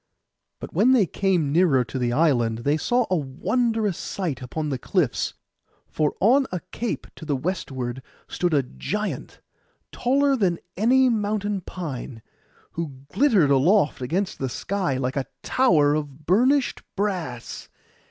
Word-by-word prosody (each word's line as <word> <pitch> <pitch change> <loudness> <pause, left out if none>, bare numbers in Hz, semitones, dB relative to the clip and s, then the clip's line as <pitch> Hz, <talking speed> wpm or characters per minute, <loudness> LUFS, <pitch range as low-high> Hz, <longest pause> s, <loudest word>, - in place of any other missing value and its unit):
But - - -8
when 225 +10 +4
they 230 -7 +5
came 180 -6 0
nearer 155 -6 +4
to 130 +2 -5
the 120 -1 0
island 120 -6 +2
they 145 +3 +2
saw 245 +9 +1
a - - +4
wondrous 205 - 0
sight 165 -10 -3
upon 150 +5 -4
the 135 -3 -2
cliffs. 160 -4 0 0.6
For 150 -2 0
on 260 +7 +4
a 180 -2 -3
cape 235 0 -3
to - - -10
the 150 -2 -1
westward 130 -5 -3 0.3
stood 175 -1 -1
a 145 -3 +3
giant, 205 - -5 0.5
taller 275 +2 +2
than 185 -8 +1 0.2
any 255 +6 +4
mountain 210 -3 0
pine, 135 -10 -7 0.5
who 165 -5 -5 0.2
glittered 215 - +4
aloft 150 +3 +3
against 180 +10 -2
the 130 - -2
sky 185 -1 -2
like 130 0 -2
a 135 - -1 0.2
tower 155 - +3
of 150 -1 -4
burnished 250 - +2
brass. 180 - -3
170 Hz, 140 wpm, -24 LUFS, 135-210 Hz, 0.6 s, they